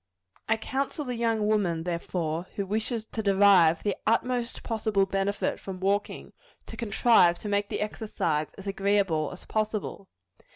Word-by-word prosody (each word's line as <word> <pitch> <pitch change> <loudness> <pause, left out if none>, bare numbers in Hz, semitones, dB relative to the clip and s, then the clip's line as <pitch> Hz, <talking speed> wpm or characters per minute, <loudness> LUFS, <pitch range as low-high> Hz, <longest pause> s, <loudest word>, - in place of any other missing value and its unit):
I 225 - +3
counsel 275 +6 -3
the 250 - -3
young 230 -2 0
woman, 195 -6 +1
therefore, 170 -1 -3
who 200 - -2
wishes 220 +3 -2
to 220 - -4
derive 195 -5 +5
the 205 -2 0
utmost 240 +2 0
possible 220 -3 +1
benefit 195 +1 -1
from 190 -1 -7
walking, 200 +2 -1 0.3
to - - -9
contrive 220 -5 +4
to - - -8
make 205 0 0
the - - -3
exercise 170 -8 -1
as 195 - -10
agreeable 195 -6 +1
as 180 - -11
possible. 215 -2 -3
200 Hz, 150 wpm, -27 LUFS, 185-220 Hz, 0.3 s, derive